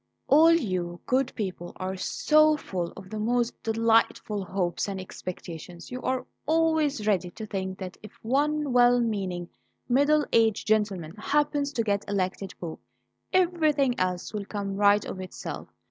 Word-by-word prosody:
"All 315 Hz, +4 st, +7 dB
you 185 Hz, -, 0 dB
good 260 Hz, 0 st, +1 dB
people 185 Hz, -5 st, -4 dB
are 185 Hz, +1 st, -4 dB
so 305 Hz, +10 st, +3 dB
full 180 Hz, -10 st, -4 dB
of 190 Hz, 0 st, -11 dB
the 215 Hz, -, -4 dB
most 240 Hz, +2 st, 0 dB
delightful 225 Hz, -2 st, +1 dB
hopes 185 Hz, 0 st, -2 dB
and 195 Hz, -1 st, -4 dB
expectations; 175 Hz, -1 st, -8 dB
you 250 Hz, 0 st, -5 dB
are 255 Hz, -1 st, -1 dB, 0.2 s
always 315 Hz, -6 st, +2 dB
ready 185 Hz, -4 st, +1 dB
to 215 Hz, +5 st, -8 dB
think 190 Hz, -2 st, -4 dB
that 185 Hz, -1 st, -7 dB
if 215 Hz, -, -11 dB
one 290 Hz, +3 st, +1 dB
well 245 Hz, 0 st, +6 dB
meaning 190 Hz, -7 st, -2 dB, 0.4 s
middle 285 Hz, +4 st, +3 dB
aged 225 Hz, -2 st, +3 dB
gentleman 205 Hz, -7 st, 0 dB
happens 290 Hz, +3 st, +1 dB
to 230 Hz, -, 0 dB
get 200 Hz, -2 st, 0 dB
elected 195 Hz, 0 st, -2 dB
Pope, 165 Hz, -2 st, -6 dB, 0.5 s
everything 310 Hz, -7 st, +3 dB
else 180 Hz, +1 st, -1 dB
will 205 Hz, -1 st, -3 dB
come 200 Hz, -1 st, -4 dB
right 205 Hz, +1 st, +4 dB
of 185 Hz, -, -6 dB
itself. 185 Hz, -, -7 dB
215 Hz, 150 wpm, -27 LUFS, 190-270 Hz, 0.5 s, All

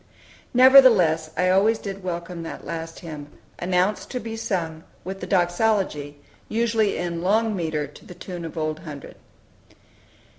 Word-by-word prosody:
Nevertheless 230 Hz, -12 st, +7 dB
I 180 Hz, +1 st, +2 dB
always 210 Hz, +4 st, +4 dB
did 195 Hz, -2 st, -7 dB
welcome 175 Hz, -1 st, -5 dB
that 165 Hz, -, -8 dB
last 165 Hz, 0 st, -6 dB
hymn, 150 Hz, -4 st, -8 dB, 0.3 s
announced 185 Hz, +3 st, 0 dB
to 250 Hz, -, -3 dB
be 225 Hz, -1 st, -6 dB
sung 165 Hz, -7 st, -3 dB, 0.2 s
"with 190 Hz, +2 st, -6 dB
the -, -, -6 dB
Doxology," 175 Hz, -6 st, 0 dB, 0.3 s
usually 225 Hz, -2 st, +1 dB
in 170 Hz, -1 st, -3 dB
"long 215 Hz, +4 st, +2 dB
metre," 160 Hz, -4 st, -2 dB
to 145 Hz, -, -15 dB
the 180 Hz, -, -11 dB
tune 175 Hz, -1 st, -7 dB
of 165 Hz, 0 st, -7 dB
"Old 155 Hz, 0 st, -2 dB
Hundred." 150 Hz, -4 st, -9 dB
180 Hz, 145 wpm, -24 LUFS, 165-210 Hz, 0.3 s, Nevertheless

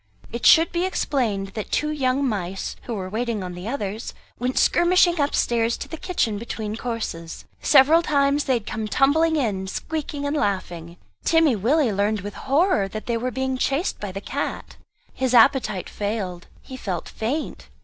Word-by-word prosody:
It 235 Hz, -, 0 dB
should 325 Hz, +1 st, +7 dB
be 345 Hz, 0 st, 0 dB
explained 235 Hz, -, -1 dB
that 210 Hz, +1 st, -6 dB
two 300 Hz, 0 st, 0 dB
young 270 Hz, -1 st, +1 dB
mice, 195 Hz, -4 st, -3 dB
who 235 Hz, -, -3 dB
were 190 Hz, -2 st, -4 dB
waiting 220 Hz, 0 st, -2 dB
on 180 Hz, -1 st, -6 dB
the 180 Hz, +3 st, -7 dB
others, 220 Hz, -3 st, -4 dB, 0.2 s
went 250 Hz, +2 st, -2 dB
skirmishing 345 Hz, -1 st, +4 dB
upstairs 235 Hz, -5 st, +1 dB
to -, -, -6 dB
the -, -, -6 dB
kitchen 310 Hz, -, -1 dB
between 220 Hz, -2 st, -5 dB
courses. 220 Hz, -9 st, -5 dB, 0.2 s
Several 300 Hz, +4 st, +6 dB
times 285 Hz, -2 st, +2 dB
they 260 Hz, -, +2 dB
had 230 Hz, -3 st, -3 dB
come 220 Hz, 0 st, -4 dB
tumbling 315 Hz, +8 st, +3 dB
in, 205 Hz, -10 st, -1 dB
squeaking 295 Hz, +5 st, -4 dB
and 285 Hz, +1 st, -1 dB
laughing; 175 Hz, -, -2 dB, 0.3 s
Timmy 325 Hz, -6 st, +4 dB
Willie 240 Hz, +4 st, +2 dB
learnt 205 Hz, 0 st, 0 dB
with 205 Hz, 0 st, -6 dB
horror 280 Hz, -, +1 dB
that 215 Hz, +2 st, -7 dB
they 235 Hz, -, -1 dB
were 240 Hz, +2 st, -1 dB
being 260 Hz, +1 st, -2 dB
chased 280 Hz, +9 st, 0 dB
by 205 Hz, -2 st, -5 dB
the 195 Hz, +1 st, -6 dB
cat. -, -, -4 dB, 0.4 s
His 260 Hz, -1 st, 0 dB
appetite 225 Hz, -5 st, +4 dB
failed, 200 Hz, -4 st, -4 dB, 0.2 s
he 260 Hz, -, -9 dB
felt 185 Hz, -8 st, -4 dB
faint. 265 Hz, +8 st, -4 dB
235 Hz, 170 wpm, -23 LUFS, 205-285 Hz, 0.4 s, should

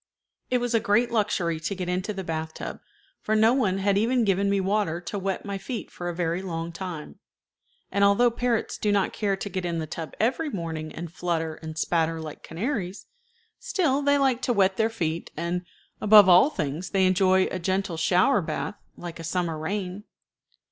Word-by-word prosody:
It 250 Hz, -, +3 dB
was 245 Hz, -1 st, -1 dB
a 230 Hz, -, +4 dB
great 220 Hz, +4 st, +2 dB
luxury 185 Hz, -7 st, 0 dB
to 195 Hz, +5 st, -3 dB
get 180 Hz, -1 st, -4 dB
into 180 Hz, +3 st, -1 dB
the 195 Hz, -2 st, -5 dB
bath 160 Hz, -2 st, -4 dB
tub, -, -, -6 dB, 0.4 s
for 215 Hz, -, 0 dB
no 220 Hz, +2 st, +5 dB
one 210 Hz, -8 st, +1 dB
had 200 Hz, 0 st, +2 dB
even 235 Hz, +2 st, +2 dB
given 200 Hz, 0 st, +2 dB
me 200 Hz, 0 st, +2 dB
water 190 Hz, -3 st, 0 dB
to 200 Hz, +3 st, -4 dB
wet 195 Hz, +1 st, -3 dB
my 200 Hz, -1 st, -4 dB
feet 230 Hz, +4 st, -6 dB
for 175 Hz, 0 st, -5 dB
a 175 Hz, -, -4 dB
very 170 Hz, +1 st, -1 dB
long 165 Hz, -3 st, -4 dB
time; 170 Hz, -3 st, -7 dB, 0.7 s
and 200 Hz, +1 st, +2 dB
although 200 Hz, +5 st, +5 dB
parrots 235 Hz, -1 st, -1 dB
do 210 Hz, -, +1 dB
not 200 Hz, -2 st, +1 dB
care 200 Hz, -2 st, 0 dB
to 195 Hz, -, -5 dB
get 190 Hz, -2 st, -3 dB
in 170 Hz, -1 st, -2 dB
the 160 Hz, -, -2 dB
tub 160 Hz, +1 st, -7 dB
every 260 Hz, +8 st, +1 dB
morning 160 Hz, -, -4 dB
and 170 Hz, 0 st, -7 dB
flutter 165 Hz, -3 st, -1 dB
and 160 Hz, -1 st, -7 dB
spatter 165 Hz, 0 st, +1 dB
like 155 Hz, -2 st, -8 dB
canaries, 195 Hz, -, -4 dB, 0.5 s
still 290 Hz, -8 st, +1 dB
they 285 Hz, 0 st, +3 dB
like 265 Hz, -3 st, +2 dB
to 245 Hz, -, +1 dB
wet 195 Hz, -3 st, +3 dB
their 220 Hz, +2 st, +2 dB
feet, 165 Hz, -7 st, -3 dB
and, 175 Hz, +2 st, -2 dB, 0.3 s
above 210 Hz, -2 st, +8 dB
all 185 Hz, +9 st, +7 dB
things, 165 Hz, -, -3 dB
they 190 Hz, -2 st, +2 dB
enjoy 185 Hz, 0 st, +4 dB
a 185 Hz, -, -3 dB
gentle 190 Hz, 0 st, -1 dB
shower 180 Hz, +8 st, +3 dB
bath, 205 Hz, +4 st, -4 dB, 0.2 s
like 170 Hz, -1 st, -7 dB
a -, -, -6 dB
summer 170 Hz, 0 st, -1 dB
rain. 190 Hz, +4 st, -4 dB
190 Hz, 195 wpm, -26 LUFS, 170-215 Hz, 0.7 s, above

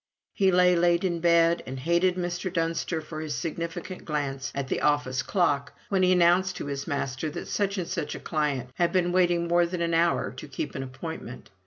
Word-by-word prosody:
He 190 Hz, -1 st, +3 dB
lay 180 Hz, 0 st, +5 dB
late 175 Hz, +1 st, +3 dB
in 175 Hz, -3 st, 0 dB
bed, 170 Hz, 0 st, +4 dB
and 130 Hz, 0 st, -5 dB
hated 170 Hz, +5 st, +2 dB
Mr. 175 Hz, 0 st, -3 dB
Dunster 165 Hz, -1 st, -1 dB
for 155 Hz, 0 st, -7 dB
his 155 Hz, -2 st, -3 dB
significant 170 Hz, +2 st, -5 dB
glance 135 Hz, -3 st, -3 dB
at 140 Hz, -1 st, -2 dB
the -, -, -2 dB
office 145 Hz, -3 st, +1 dB
clock 145 Hz, -7 st, 0 dB, 0.2 s
when 195 Hz, -2 st, +2 dB
he 185 Hz, 0 st, +4 dB
announced 180 Hz, +1 st, +4 dB
to -, -, -5 dB
his 140 Hz, -1 st, -4 dB
master 140 Hz, 0 st, -2 dB
that -, -, -6 dB
such 200 Hz, 0 st, -1 dB
and 180 Hz, -3 st, -2 dB
such 170 Hz, -5 st, -3 dB
a -, -, -6 dB
client 145 Hz, -6 st, -2 dB
had 170 Hz, +4 st, +1 dB
been 180 Hz, -2 st, +2 dB
waiting 175 Hz, -1 st, +2 dB
more 175 Hz, 0 st, +3 dB
than 180 Hz, 0 st, -4 dB
an 170 Hz, 0 st, 0 dB
hour 170 Hz, +1 st, +2 dB
to -, -, -9 dB
keep 140 Hz, +1 st, -5 dB
an -, -, -4 dB
appointment. 130 Hz, -2 st, -7 dB
170 Hz, 205 wpm, -27 LUFS, 145-175 Hz, 0.2 s, lay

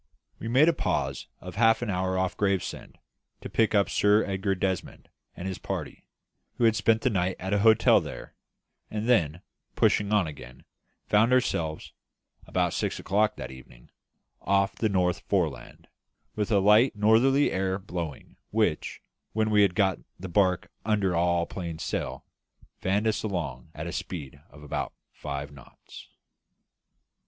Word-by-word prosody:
We -, -, -5 dB
made 130 Hz, +7 st, +5 dB
a 170 Hz, -, +5 dB
pause -, -, -2 dB
of -, -, -9 dB
half 115 Hz, +1 st, +4 dB
an 110 Hz, -, -2 dB
hour 95 Hz, 0 st, -1 dB
off 95 Hz, 0 st, -1 dB
Gravesend, 100 Hz, -2 st, -2 dB, 0.4 s
to -, -, -7 dB
pick 110 Hz, -1 st, +2 dB
up 100 Hz, -1 st, +4 dB
Sir 105 Hz, +1 st, +3 dB
Edgar 95 Hz, 0 st, -1 dB
Desmond 95 Hz, 0 st, -3 dB, 0.3 s
and 90 Hz, -, -6 dB
his 95 Hz, -, -4 dB
party -, -, -6 dB, 0.5 s
who -, -, -2 dB
had 115 Hz, -1 st, +5 dB
spent 110 Hz, +2 st, +2 dB
the 130 Hz, -, +2 dB
night 95 Hz, -2 st, 0 dB
at 95 Hz, +2 st, -3 dB
an 100 Hz, -, +3 dB
hotel 110 Hz, +1 st, +5 dB
there -, -, -8 dB, 0.6 s
and 110 Hz, +1 st, -3 dB
then, 85 Hz, -9 st, +2 dB, 0.3 s
pushing 105 Hz, 0 st, +2 dB
on 105 Hz, -3 st, +3 dB
again, 65 Hz, -5 st, -10 dB, 0.4 s
found 110 Hz, +4 st, +3 dB
ourselves, 85 Hz, -11 st, 0 dB, 0.5 s
about -, -, 0 dB
six -, -, -2 dB
o'clock 105 Hz, +2 st, +1 dB
that 65 Hz, -4 st, -7 dB
evening, 65 Hz, -2 st, -15 dB, 0.5 s
off 100 Hz, +1 st, +2 dB
the 110 Hz, -, 0 dB
North 90 Hz, -2 st, +1 dB
Foreland, -, -, -2 dB, 0.5 s
with 105 Hz, +1 st, -2 dB
a 105 Hz, -, +4 dB
light 105 Hz, +6 st, +5 dB
northerly 115 Hz, +7 st, +4 dB
air 95 Hz, 0 st, 0 dB
blowing, 90 Hz, -6 st, -7 dB
which, 105 Hz, -7 st, -1 dB, 0.3 s
when 110 Hz, 0 st, +1 dB
we 105 Hz, -1 st, +5 dB
had 95 Hz, -3 st, +3 dB
got 95 Hz, -3 st, +2 dB, 0.2 s
the 95 Hz, -, -6 dB
barque 90 Hz, -1 st, +1 dB
under 100 Hz, -5 st, +1 dB
all 85 Hz, 0 st, +2 dB
plain 85 Hz, -4 st, -6 dB
sail, -, -, -4 dB, 0.5 s
fanned 100 Hz, +3 st, 0 dB
us 110 Hz, -1 st, +1 dB
along 90 Hz, -6 st, -4 dB
at 75 Hz, -, -5 dB
a 85 Hz, -, -4 dB
speed 70 Hz, -6 st, -6 dB
of 75 Hz, -, -15 dB
about 75 Hz, -, -4 dB, 0.2 s
five 70 Hz, -1 st, -6 dB
knots. 70 Hz, -3 st, -14 dB
95 Hz, 155 wpm, -27 LUFS, 85-110 Hz, 0.6 s, made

